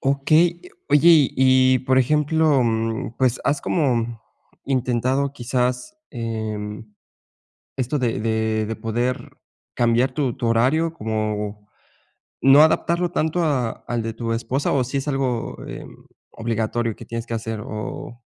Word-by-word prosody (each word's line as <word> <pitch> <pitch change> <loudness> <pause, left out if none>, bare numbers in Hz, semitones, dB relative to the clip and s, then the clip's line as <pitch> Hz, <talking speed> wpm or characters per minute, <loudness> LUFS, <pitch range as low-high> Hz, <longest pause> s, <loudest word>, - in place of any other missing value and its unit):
Okey. 155 +5 +2 0.3
Oye, 150 +3 +5
y 130 -4 +5
y, - - -1
por 130 +1 +2
ejemplo, 150 +1 +2
mm, 115 0 -1
pues, 130 -2 +1
¿has 140 0 +1
como 120 -8 0 0.4
intentado 130 +1 0
quizás, 125 +4 -2
em, 110 -3 -5 0.9
esto 130 +3 -1
de 120 -5 -1
de 110 0 0
de 110 +1 -4
poder 120 +3 -3 0.4
cambiar 120 +2 +2
tu 135 -5 -1
tu 120 - -2
horario? 135 +9 +2
¿Como 105 -3 -3 0.7
no 135 +2 +7
adaptarlo 170 +2 +1
tanto 160 +1 0
a 135 -7 +1 0.2
al 120 -1 -1
de 115 0 -4
tu 115 0 -3
esposa, 130 +4 -1
o 135 - +2
si 130 +3 -3
es 135 - -4
algo, 130 -4 -2
eh, - - -7 0.5
obligatorio 115 0 -2
que - - -11
tienes 115 0 -5
que 115 - -5
hacer?, 110 -1 -4
o 110 +2 -7
125 Hz, 135 wpm, -22 LUFS, 115-140 Hz, 0.9 s, no